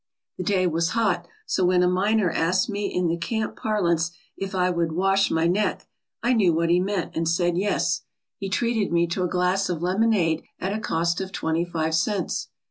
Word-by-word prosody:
The - - -1
day 185 0 +1
was 165 -1 +1
hot, 225 -1 +1 0.2
so 190 - 0
when 180 0 +4
a - - +4
miner 195 +1 +2
asked 180 +4 +1
me 205 0 -2
in 180 -2 0
the 165 +1 0
camp 215 +6 -2
parlance 170 -6 0 0.3
if 195 0 -5
I 180 0 +2
would 170 -2 -1
"wash 195 +3 +2
my 160 0 +1
neck," 190 +5 0 0.4
I 245 +2 +3
knew 195 -8 +3
what 165 +1 +1
he 175 - +4
meant 190 -1 -2
and 165 0 0
said 175 +1 +1
yes. 200 +3 0 0.4
He 195 - -4
treated 225 0 0
me 170 0 +3
to 170 +2 -3
a 180 - +1
glass 185 +2 +1
of 175 -2 -2
lemonade 185 -4 +2 0.2
at 190 +2 -2
a 215 - -2
cost 170 -2 0
of 190 0 -5
twenty 165 -2 -1
five 160 -2 -2
cents. 190 +3 0
180 Hz, 205 wpm, -24 LUFS, 170-200 Hz, 0.4 s, when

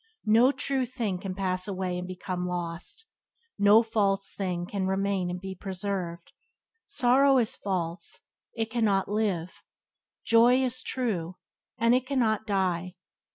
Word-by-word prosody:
No 230 +5 +5
true 270 -2 -1
thing 225 -7 -3
can 185 0 -5
pass 185 -1 0
away 185 -2 -2
and 180 - -6
become 180 0 -4
lost; 175 - -4 0.5
no 205 +3 +6
false 200 -3 0
thing 180 -3 -3
can 190 0 -2
remain 190 -1 0
and 180 0 -4
be 190 +1 -6
preserved. 185 -3 -5 0.6
Sorrow 265 +2 +4
is 235 -4 +1
false, 170 -3 -4 0.4
and 225 - +1
it 220 - -24
cannot 210 -5 +1
live; 200 -5 -2 0.6
joy 240 +3 +5
is 255 0 -1
true, 185 -9 -2 0.4
and 230 +1 +3
it 255 +1 +1
cannot 225 -6 +1
die. 185 -3 -1
195 Hz, 140 wpm, -28 LUFS, 180-230 Hz, 0.6 s, no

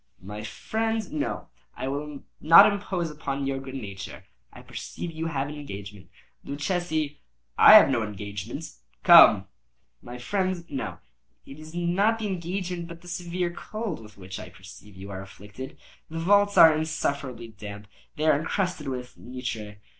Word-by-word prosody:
"My 105 +3 -7
friend, 220 - -2
no; 150 - -3 0.3
I 130 - -3
will 145 +1 -5 0.2
not 165 +2 +9
impose 185 -5 -3
upon 140 -2 -4
your 135 0 -1
good 135 0 -8
nature. 100 -6 -7 0.3
I 125 - -13
perceive 125 +7 -7
you 165 0 -4
have 140 -3 -2
an 145 - -6
engagement. 100 -9 -9 0.3
Luchesi—" 155 0 -2 0.4
"I - - +9
have - - +10
no 130 -4 +1
engagement;—come." 100 - +4 0.6
"My 120 +1 -9
friend, 185 +5 -2
no. 110 - -4 0.5
It 135 +2 -11
is 155 +2 -11
not 185 +6 +2
the 225 - -4
engagement, 180 -2 -3
but 170 -1 -10
the 175 - -15
severe 175 0 -3
cold 215 -1 -5
with 105 -1 -15
which 95 -1 -8
I 90 - -8
perceive 95 +2 -14
you 95 +1 -9
are 95 -1 -5
afflicted. 105 +6 -10 0.3
The 165 - -6
vaults 205 +4 +3
are 160 -1 +9
insufferably 140 -6 -3
damp. 105 -1 -9 0.3
They 155 - -2
are 150 -2 +4
encrusted 180 -1 -2
with 125 -2 -6
nitre." 115 -4 -6
145 Hz, 155 wpm, -26 LUFS, 110-170 Hz, 0.6 s, have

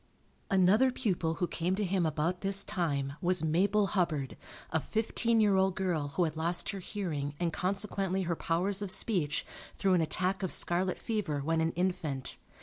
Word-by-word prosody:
Another 195 +7 +4
pupil 180 -10 -1
who 175 - 0
came 175 +3 -1
to 210 - -1
him 185 -3 +1
about 160 +4 -1
this 195 0 +5
time 145 -8 -2
was 180 -2 +1
Mabel 195 +6 +2
Hubbard, 160 -8 0 0.4
a 160 - +1
fifteen 225 +4 0
year 205 -2 +4
old 190 -1 +2
girl 175 -6 -1
who 180 - +2
had 160 -2 -2
lost 170 +2 -1
her 200 - -3
hearing 160 -8 -4
and 170 -2 -1
consequently 195 0 -1
her 170 -1 -1
powers 185 +5 0
of 200 - -3
speech, 180 -7 +1 0.3
through 195 -1 +2
an 180 - +3
attack 185 +5 -1
of 185 - +1
scarlet 180 +2 +2
fever 195 -11 -2
when 160 +3 0
an 160 0 +1
infant. 160 -7 -2
180 Hz, 175 wpm, -31 LUFS, 160-195 Hz, 0.4 s, this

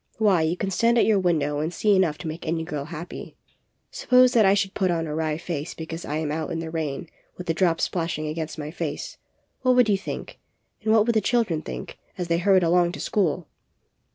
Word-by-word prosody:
Why, 205 -6 +3
you 160 +3 0
can 195 +1 -2
stand 230 +5 +3
at - - +5
your 215 -3 +3
window 150 -5 +1
and 155 +3 -1
see 205 +3 +2
enough 170 -6 +2
to 175 - -7
make 160 +1 -6
any 160 0 -1
girl 150 -4 -4
happy. 170 +2 -8 0.5
Suppose 250 0 +4
that 220 -4 +5
I 195 - +5
should 195 -1 0
put 190 -3 +1
on 165 -2 0
a 150 - -4
wry 155 -1 -1
face 165 -2 -5
because 165 +1 -6
I 150 - -3
am 155 -2 -2
out 160 +3 -3
in 170 - -3
the 165 -1 -5
rain 160 -1 -3 0.3
with 180 - -7
the 165 - 0
drops 170 -1 +1
splashing 165 -3 -1
against 155 +1 -4
my 150 0 -5
face, - - -5 0.4
what 255 -1 +3
would 250 -3 +5
you 200 - +3
think, - - -7 0.4
and 220 0 0
what 220 -1 +5
would 235 - +2
the 220 - +3
children 210 -8 +1
think, 60 -1 -7 0.2
as 175 -2 -4
they 170 0 +2
hurried 190 0 +4
along 175 +1 +3
to - - -7
school?" 175 -5 0
170 Hz, 230 wpm, -24 LUFS, 160-195 Hz, 0.5 s, at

